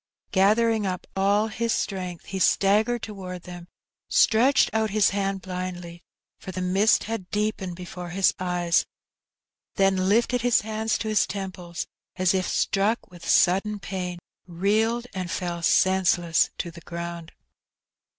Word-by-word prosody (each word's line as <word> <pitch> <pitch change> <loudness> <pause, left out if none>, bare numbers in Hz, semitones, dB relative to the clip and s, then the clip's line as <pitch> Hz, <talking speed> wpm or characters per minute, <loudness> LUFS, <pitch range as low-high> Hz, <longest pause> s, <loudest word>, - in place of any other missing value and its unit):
Gathering 215 +2 +3
up 180 -1 -4
all 200 +3 +2
his 230 +1 -2
strength, 180 -4 -3
he 190 - -5
staggered 215 +6 +2
towards 185 -4 -7
them, 175 -1 -9 0.4
stretched 245 +5 +4
out 220 0 +1
his 205 -1 +3
hand 195 -1 -2
blindly, 180 -2 -6 0.4
for 185 - -8
the 185 - -5
mist 190 +4 +3
had 220 -5 -5
deepened 210 -4 -2
before 180 0 -8
his 190 +2 +2
eyes, 175 -2 +1 0.9
then 190 -1 +2
lifted 235 +3 +2
his 245 0 +3
hands 220 +1 -1
to 220 - -4
his 215 -1 +2
temples, 185 -3 -5 0.3
as 185 0 +2
if 185 -1 0
struck 205 +2 0
with 175 -1 -9
sudden 200 +4 +3
pain, 180 -2 -4 0.3
reeled, 215 +7 0
and 185 -2 -4
fell 175 0 -3
senseless 175 -2 +3
to 170 - -4
the 170 0 -12
ground. 170 -1 -7
190 Hz, 140 wpm, -25 LUFS, 180-215 Hz, 0.9 s, stretched